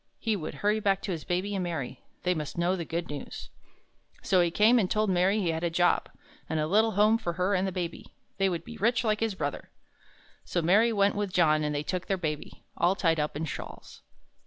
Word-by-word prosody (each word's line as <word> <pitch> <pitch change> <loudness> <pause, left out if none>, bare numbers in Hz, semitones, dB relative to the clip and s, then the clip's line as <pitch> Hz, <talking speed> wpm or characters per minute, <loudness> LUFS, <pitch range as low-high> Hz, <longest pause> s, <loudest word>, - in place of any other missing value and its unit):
He 225 -2 -1
would 170 -6 -5
hurry 210 +1 +3
back 195 -2 +1
to 195 - -3
his 165 -4 -4
Baby 185 +3 -1
and 190 -2 -1
Mary. 145 -8 -4 0.2
They 180 - +2
must 155 -2 -5
know 175 +2 +2
the 170 -3 -4
good 170 +1 -3
news. 145 - -7 0.7
So 185 -2 +3
he 175 - +2
came 220 +7 +4
and 190 -4 +1
told 215 -2 +1
Mary 185 +4 +2
he 180 -5 0
had 160 +1 -2
a 170 - +1
job, 175 +1 +2 0.4
and 160 - 0
a 155 - +1
little 215 +6 +3
home 215 +3 +4
for 170 -7 -3
her 180 +3 0
and 190 0 +1
the - - -2
Baby. 175 -2 -5 0.2
They 195 0 +3
would 170 -2 -3
be 235 -1 -9
rich 230 +3 +2
like 215 -2 +1
his 225 -3 -1
brother. - - -4 0.7
So 175 - -2
Mary 210 +8 +4
went 200 -2 +3
with 205 -2 -2
John 155 -4 +3
and 150 0 -1
they 145 - -1
took 180 +2 -3
their 195 - 0
Baby, 155 -4 -5
all 175 +3 +2
tied 165 -4 +1
up 150 -1 -2
in 160 - -2
shawls. 115 -7 -8
180 Hz, 230 wpm, -28 LUFS, 165-205 Hz, 0.7 s, came